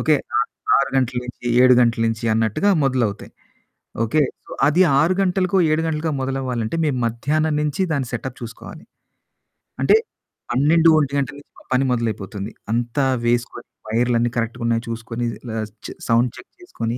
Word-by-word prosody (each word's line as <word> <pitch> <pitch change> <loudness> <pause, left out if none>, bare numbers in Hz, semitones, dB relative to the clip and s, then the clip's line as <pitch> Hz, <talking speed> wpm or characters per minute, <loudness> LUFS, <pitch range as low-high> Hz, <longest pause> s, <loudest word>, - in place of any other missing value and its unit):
Okay. 155 -1 +3 0.6
6 140 - +1
గంటల 130 -1 +1
నుంచి 125 0 -10 0.2
7 130 -1 +7
గంటల 115 -1 +2
నుంచి 115 +1 -2
అన్నట్టుగా 115 - +1
మొదలవుతాయి. 120 -6 -1 0.7
ఓకే. 145 +7 +2 0.2
సో, - - -15 0.2
అది 155 +5 +3 0.2
6 170 +4 +3
గంటలకో, 185 0 +1
7 155 +1 +2
గంటలకో 160 0 -1
మొదలవ్వాలంటే 130 -1 -2
మేము 135 -4 0
మధ్యాహ్నం 150 +7 0
నుంచి 150 +4 -1
దాని 135 -4 -1
సెటప్ 125 +1 -5
చూసుకోవాలి. 115 -1 -9 1.0
అంటే - - +5 0.6
12 160 +6 +4
ఒంటి 140 -2 -1
గంటల 140 0 -2
నుంచి 145 - -21
మా - - -20
పని 130 - +3
మొదలైపోతుంది. 110 -3 -3 0.2
అంతా 120 +4 0 0.2
వేసుకొని, 120 0 -1 0.2
వైర్లన్నీ 120 +1 +1
కరెక్ట్‌గా 115 +1 -2
ఉన్నాయ 115 0 +1
చూసుకొని, 115 +1 -4 0.3
ఆహ్, 110 -1 -2 0.2
చ్ - - -5 0.2
సౌండ్ 115 +1 +3
చెక్ - - -13
చేసుకొని, 115 - -4
125 Hz, 150 wpm, -21 LUFS, 115-150 Hz, 1.0 s, 7